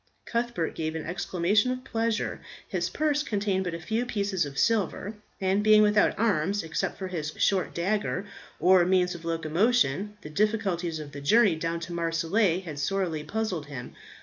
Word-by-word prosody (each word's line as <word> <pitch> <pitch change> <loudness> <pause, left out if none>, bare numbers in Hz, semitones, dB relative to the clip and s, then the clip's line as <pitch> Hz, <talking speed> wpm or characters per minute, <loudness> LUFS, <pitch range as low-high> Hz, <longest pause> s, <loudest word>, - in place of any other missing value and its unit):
Cuthbert 235 -8 -1
gave 160 0 -3
an 160 - -4
exclamation 180 +5 +1
of 255 0 -4
pleasure. 230 -1 -1 0.3
His - - -1
purse 300 -1 +1
contained 200 -7 -1
but 175 -2 -2
a - - -6
few 220 +8 -1
pieces 200 -8 -1
of 140 -1 -9
silver, 210 -1 +1 0.3
and 190 +1 +1
being 215 0 +7
without 210 0 +3
arms 200 -2 +1
except 160 0 -2
for 190 - -4
his 155 -4 -3
short 190 -2 +1
dagger, 200 +2 -1 0.3
or 185 -1 +6
means 180 0 +2
of 170 -1 -9
locomotion, 185 - +1
the 150 - -7
difficulties 190 -4 0
of 150 -2 -8
the 140 0 -8
journey 205 +4 +4
down 165 +1 -2
to 170 +1 -6
Marseilles 170 +3 +1
had 150 -4 -6
sorely 165 -1 -1
puzzled 190 -7 -3
him. 130 -4 -8
185 Hz, 170 wpm, -27 LUFS, 165-210 Hz, 0.3 s, being